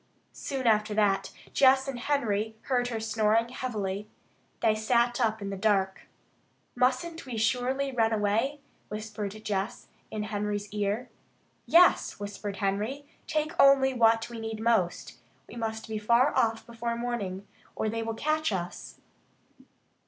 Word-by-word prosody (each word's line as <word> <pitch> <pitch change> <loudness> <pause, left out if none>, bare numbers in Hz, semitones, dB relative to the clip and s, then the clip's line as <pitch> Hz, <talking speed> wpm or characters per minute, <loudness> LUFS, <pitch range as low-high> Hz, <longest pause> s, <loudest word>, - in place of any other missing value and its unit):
Soon 270 -2 -4
after 215 -1 +3
that 195 -2 +2 0.2
Jess 265 0 +5
and 265 -3 -4
Henry 220 -6 0
heard 250 -2 +1
her 230 -2 -3
snoring 220 +1 +1
heavily. 210 -5 -4 0.5
They 220 - +4
sat 235 +3 +1
up 220 -2 0
in 200 - -4
the - - -3
dark. 195 -1 0 0.7
"Mustn't 275 +5 0
we 240 -3 -4
surely 260 +4 0
run 225 -3 +2
away?" 225 +7 0 0.3
whispered 210 -1 -4 0.2
Jess 200 +1 -3 0.2
in 215 -1 -3
Henry's 210 -1 -3
ear. 210 +4 -2 0.6
"Yes!" 345 - +5
whispered 205 0 -5
Henry. 210 +9 -2 0.2
"Take 305 0 0
only 270 -1 +6
what 225 -2 +3
we 235 -1 -8
need 225 -1 -5
most. 220 -6 0 0.3
We - - -11
must 220 -1 -4
be 220 -1 -3
far 235 +6 +3
off 225 0 +1
before 235 0 -3
morning, 215 -5 -3 0.3
or - - -1
they 225 +1 -2
will 225 0 -3
catch 310 +1 0
us." 175 -2 -5
225 Hz, 140 wpm, -28 LUFS, 210-250 Hz, 0.7 s, only